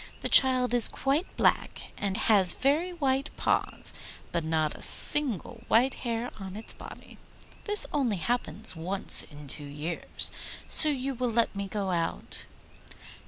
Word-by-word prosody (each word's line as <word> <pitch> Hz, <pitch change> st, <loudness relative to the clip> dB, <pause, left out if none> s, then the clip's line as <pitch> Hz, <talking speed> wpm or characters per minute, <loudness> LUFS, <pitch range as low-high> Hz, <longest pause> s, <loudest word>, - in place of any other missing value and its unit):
The -, -, -4 dB
child 255 Hz, -2 st, +4 dB
is 240 Hz, -2 st, +5 dB
quite 280 Hz, +7 st, -3 dB
black, -, -, -2 dB
and 200 Hz, -1 st, -5 dB
has 195 Hz, -5 st, +4 dB
very 305 Hz, +7 st, -1 dB
white 275 Hz, -5 st, -3 dB
paws, -, -, 0 dB, 0.4 s
but 170 Hz, -, -3 dB
not 155 Hz, -1 st, -2 dB
a -, -, -14 dB
single 245 Hz, -, +3 dB
white 250 Hz, +4 st, +1 dB
hair 235 Hz, 0 st, -6 dB
on 190 Hz, -1 st, -10 dB
its 220 Hz, -, -9 dB
body. -, -, -14 dB, 0.5 s
This 415 Hz, -1 st, +3 dB
only 250 Hz, -9 st, -2 dB
happens 225 Hz, +1 st, -4 dB
once 185 Hz, +4 st, +2 dB
in 150 Hz, -1 st, -12 dB
two 145 Hz, +2 st, -3 dB
years, 150 Hz, +4 st, -3 dB, 0.3 s
so 310 Hz, -, +7 dB
you 275 Hz, -1 st, -4 dB
will 250 Hz, 0 st, -4 dB
let 230 Hz, -2 st, -1 dB
me 200 Hz, 0 st, -6 dB
go 195 Hz, -2 st, -5 dB
out? 165 Hz, -2 st, -6 dB
230 Hz, 150 wpm, -26 LUFS, 185-265 Hz, 0.5 s, so